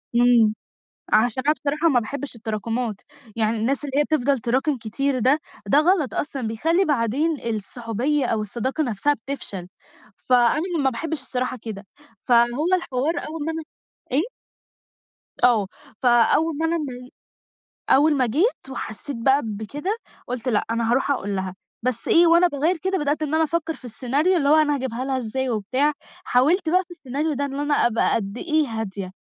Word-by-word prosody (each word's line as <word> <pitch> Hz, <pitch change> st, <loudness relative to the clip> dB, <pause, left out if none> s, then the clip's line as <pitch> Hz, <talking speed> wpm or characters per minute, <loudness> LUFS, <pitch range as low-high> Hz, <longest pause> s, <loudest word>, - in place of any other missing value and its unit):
إمم، 235 Hz, -3 st, +5 dB, 0.6 s
عشان 240 Hz, +3 st, +3 dB
أنا 300 Hz, -, +5 dB
بصراحة 300 Hz, +3 st, 0 dB
ما 250 Hz, -5 st, +3 dB
باحبش 275 Hz, +3 st, -6 dB
التراكمات، 225 Hz, +1 st, -3 dB, 0.4 s
يعني 225 Hz, 0 st, +1 dB
الناس 260 Hz, +6 st, -1 dB
اللي 280 Hz, 0 st, -2 dB
هي 295 Hz, -, +4 dB
بتفضل 280 Hz, -3 st, +1 dB
تراكم 260 Hz, +5 st, 0 dB
كتير 255 Hz, +5 st, -1 dB
ده 265 Hz, +6 st, +3 dB, 0.3 s
ده 280 Hz, +9 st, +4 dB
غلط 315 Hz, -3 st, +2 dB
أصلًا 275 Hz, -3 st, -3 dB
بيخلّي 325 Hz, -, +1 dB
بعدين 290 Hz, +3 st, +1 dB, 0.2 s
الصحُوبية 240 Hz, +7 st, -2 dB
أو 220 Hz, -, 0 dB
الصداقة 240 Hz, +8 st, -2 dB
نفْسها 255 Hz, +3 st, +1 dB
بتفشل، 215 Hz, -8 st, -6 dB, 0.5 s
فأنا 250 Hz, +5 st, +3 dB, 0.2 s
ما 265 Hz, -, +4 dB
باحبش 310 Hz, +5 st, -3 dB
الصراحة 255 Hz, -1 st, -2 dB
كده، 210 Hz, -3 st, -7 dB, 0.4 s
فهو 240 Hz, +5 st, +3 dB
الحوار 290 Hz, -2 st, -1 dB
أول 310 Hz, -1 st, -5 dB
ما 325 Hz, -, -1 dB
أنا 320 Hz, 0 st, -4 dB, 0.5 s
إيه؟ 330 Hz, -, +1 dB, 1.1 s
آه 225 Hz, -6 st, +4 dB, 0.3 s
فأول 260 Hz, +6 st, +3 dB
ما 325 Hz, -, +1 dB
أنا 335 Hz, +1 st, +1 dB
ما 250 Hz, -4 st, -6 dB, 0.8 s
أول 295 Hz, +2 st, +5 dB
ما 260 Hz, -, +2 dB
جيت، 290 Hz, -, 0 dB
وحسّيت 265 Hz, +2 st, -6 dB
بقى 265 Hz, +5 st, +3 dB
بكده، 250 Hz, -, -4 dB, 0.3 s
قُلت 250 Hz, 0 st, -4 dB
لأ 215 Hz, -4 st, +1 dB
أنا 230 Hz, 0 st, 0 dB
هاروح 265 Hz, +3 st, +2 dB
أقول 205 Hz, -7 st, -1 dB
لها، 190 Hz, -1 st, -3 dB, 0.3 s
بس 245 Hz, -3 st, -2 dB
إيه 340 Hz, +1 st, +6 dB
وأنا 340 Hz, +2 st, +6 dB
باغيّر 315 Hz, +4 st, 0 dB
كده 380 Hz, +3 st, -1 dB
بدأت 295 Hz, 0 st, -1 dB
إن 305 Hz, -1 st, -2 dB
أنا 320 Hz, -, +3 dB
أفكر 325 Hz, 0 st, -1 dB
في 255 Hz, -, -14 dB
السيناريو 280 Hz, -, +1 dB
اللي 280 Hz, -3 st, +1 dB
هو 305 Hz, -, +7 dB
أنا 300 Hz, -2 st, +3 dB
هاجيبها 255 Hz, -1 st, -3 dB
لها 265 Hz, -1 st, -1 dB
إزاي 255 Hz, +2 st, -2 dB
وبتاع، 255 Hz, +7 st, +1 dB, 0.3 s
حاولت 315 Hz, +8 st, +2 dB
بقى 365 Hz, +2 st, +3 dB
في 355 Hz, -, -22 dB
السيناريو 300 Hz, -1 st, -3 dB
ده 285 Hz, +1 st, -1 dB
إن 275 Hz, 0 st, -5 dB
أنا 290 Hz, 0 st, 0 dB
أبقى 230 Hz, -1 st, +1 dB
قد 200 Hz, +1 st, -3 dB
إيه 310 Hz, -1 st, +1 dB
هادية، 205 Hz, -5 st, -5 dB
265 Hz, 170 wpm, -23 LUFS, 230-305 Hz, 1.1 s, هو